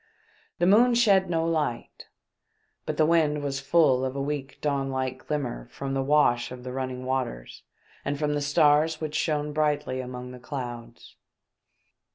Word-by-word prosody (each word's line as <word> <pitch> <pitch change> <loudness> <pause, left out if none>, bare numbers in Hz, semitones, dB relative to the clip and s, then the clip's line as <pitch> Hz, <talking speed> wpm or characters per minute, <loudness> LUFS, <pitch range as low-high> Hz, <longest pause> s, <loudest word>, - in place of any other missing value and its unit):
The 175 - +2
moon 235 +6 +5
shed 200 -6 +4
no 165 -1 0
light; 155 -7 -2 0.8
but - - -2
the 155 - +4
wind 155 -3 +2
was 135 -1 -2
full 140 -2 +3
of 130 0 -2
a - - -3
weak 140 -1 -4
dawn 140 -2 -1
like 130 -1 -4
glimmer 135 - -3
from 135 0 -5
the 135 - 0
wash 135 -4 +2
of 125 -1 -9
the 125 - -6
running 130 -1 -4
waters 130 - -3 0.4
and 145 - -2
from 150 0 0
the 145 - -1
stars 150 +2 +3
which 155 -1 -4
shone 150 -1 -1
brightly 150 -3 0
among 125 0 -7
the 125 - -10
clouds. 120 -3 -8
140 Hz, 165 wpm, -26 LUFS, 130-155 Hz, 0.8 s, moon